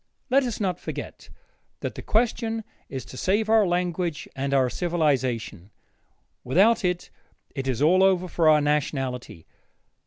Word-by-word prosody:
Let 275 +2 +5
us 240 -3 -3
not 185 -4 -1
forget - - -7 0.5
that - - -3
that - - -9
question 225 0 0 0.3
is 130 -3 -6
to 130 - -11
save 210 +7 +1
our 220 -3 +5
language 175 -2 -1
and 140 +1 -2
our 135 -2 +3
civilization; 130 - -1 0.7
without 195 - +4
that, 180 -1 -2 0.4
it 135 -2 -4
is 130 +1 0
all 180 +5 +5
over 190 -1 +3
with 175 - -12
our 155 -2 +5
nationality. 135 - -2
170 Hz, 145 wpm, -25 LUFS, 135-190 Hz, 0.7 s, Let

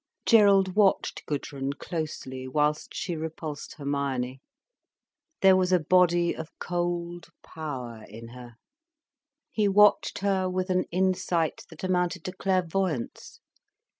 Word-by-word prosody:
Gerald 200 -4 +5
watched 205 -2 +2
Gudrun 140 -1 -3
closely, 140 -5 -5
whilst 150 +2 0
she 175 -3 -3
repulsed 155 -2 -6
Hermione. 135 -3 -3 1.0
There 190 -1 +8
was 185 0 +2
a 180 - +5
body 175 +1 +3
of 160 0 -7
cold 175 -1 -3 0.2
power 125 -8 -7
in 115 +3 -10
her. 120 -1 -12 1.0
He 210 -2 +1
watched 210 +1 +4
her 190 -2 +1
with 185 +1 -2
an 185 0 +1
insight 185 -2 0
that 160 0 -13
amounted 180 -2 0
to 185 - -3
clairvoyance. 185 -6 -2
170 Hz, 115 wpm, -27 LUFS, 145-185 Hz, 1.0 s, There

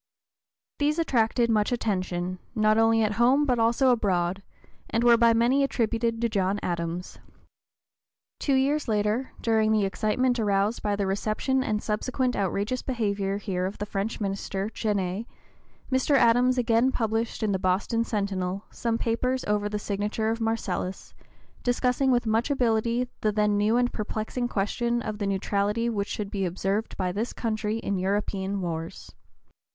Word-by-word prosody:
These 300 +2 +1
attracted 235 -6 +2
much 210 0 +2
attention, 185 -5 -2 0.2
not 215 0 +3
only 225 0 +4
at 215 - +1
home 270 +5 +5
but 250 -4 +1
also 235 +3 +3
abroad, 190 -5 0 0.5
and 230 - 0
were 240 -1 +7
by 230 0 +5
many 240 +5 +3
attributed 230 -3 0
to 235 - +3
John 200 -2 0
Adams. 170 0 -3 1.2
Two 275 - +1
years 280 +3 +1
later, 215 +4 0
during 220 -1 +2
the 215 -2 +3
excitement 240 +5 0
aroused 205 +1 +1
by 205 -1 0
the 200 -1 -1
reception 215 +7 0
and 210 -6 -1
subsequent 250 +4 -1
outrageous 200 +6 -1
behavior 200 -6 -1
here 185 -3 -2
of 195 - -7
the 205 - -3
French 205 +2 -3
minister, 195 0 -3
Genet, 205 0 -2 0.6
Mr. 260 +2 +2
Adams 250 0 +4
again 235 +1 +3
published 225 -1 -1
in 215 - +1
the 190 - 0
Boston 195 +5 +1
"Centinel" 195 -3 -2
some 230 -1 -1
papers 250 +3 -1
over 205 0 0
the 210 - -2
signature 210 +2 -1
of 230 +1 -3
Marcellus, 205 -4 -3 0.5
discussing 250 +2 +1
with 245 -2 +2
much 225 +4 +1
ability 240 -2 +1
the 215 - +2
then 210 0 +2
new 210 +3 +2
and 245 0 +1
perplexing 220 +3 -3
question 235 +3 -1
of 215 -1 -4
the 200 - -1
neutrality 205 +4 0
which 200 -2 -2
should 205 -2 -4
be 195 -2 -2
observed 195 +4 -2
by 185 -2 -1
this 215 +6 -3
country 215 -1 -2
in 200 -4 -2
European 195 0 -1
wars. 165 -2 -5
220 Hz, 155 wpm, -26 LUFS, 200-235 Hz, 1.2 s, were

